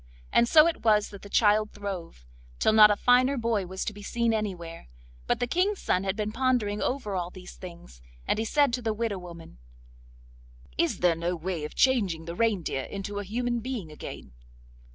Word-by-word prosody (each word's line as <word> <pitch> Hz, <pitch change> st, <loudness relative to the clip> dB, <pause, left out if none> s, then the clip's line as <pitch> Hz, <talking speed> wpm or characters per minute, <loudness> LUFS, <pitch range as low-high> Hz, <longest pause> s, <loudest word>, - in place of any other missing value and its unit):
And 235 Hz, 0 st, +4 dB
so 310 Hz, -1 st, +7 dB
it 335 Hz, -1 st, -1 dB
was 210 Hz, -2 st, +3 dB
that 200 Hz, -, -11 dB
the 200 Hz, -, -11 dB
child 215 Hz, 0 st, +3 dB
throve, 185 Hz, -, -7 dB, 0.3 s
till 220 Hz, -, +2 dB
not 215 Hz, -1 st, +8 dB
a 210 Hz, -, +3 dB
finer 255 Hz, +5 st, +3 dB
boy 225 Hz, -5 st, -1 dB
was 190 Hz, +1 st, -4 dB
to 215 Hz, -, -3 dB
be 205 Hz, -, -11 dB
seen 235 Hz, +2 st, 0 dB
anywhere. 180 Hz, -, -4 dB, 0.4 s
But -, -, +1 dB
the -, -, +1 dB
King's 370 Hz, -, 0 dB
son 185 Hz, +2 st, 0 dB
had 190 Hz, 0 st, -1 dB
been 210 Hz, 0 st, -2 dB
pondering 235 Hz, -4 st, 0 dB
over 250 Hz, -6 st, -2 dB
all 175 Hz, -1 st, -2 dB
these 180 Hz, 0 st, -11 dB
things, 170 Hz, -, -12 dB, 0.2 s
and -, -, 0 dB
he 225 Hz, -, -1 dB
said 285 Hz, +1 st, +2 dB
to 250 Hz, -, -1 dB
the 220 Hz, -2 st, -1 dB
widow 215 Hz, -3 st, -2 dB
woman: 170 Hz, -, -12 dB, 1.2 s
'Is -, -, 0 dB
there 175 Hz, -2 st, +4 dB
no 170 Hz, +2 st, -2 dB
way 170 Hz, -2 st, -4 dB
of 150 Hz, -, -9 dB
changing 200 Hz, -12 st, +2 dB
the 170 Hz, -, -5 dB
reindeer 190 Hz, -9 st, 0 dB
into 205 Hz, +1 st, -5 dB
a -, -, -4 dB
human 240 Hz, +4 st, -2 dB
being 230 Hz, -9 st, -5 dB
again? 65 Hz, -, -9 dB
205 Hz, 195 wpm, -27 LUFS, 180-235 Hz, 1.2 s, not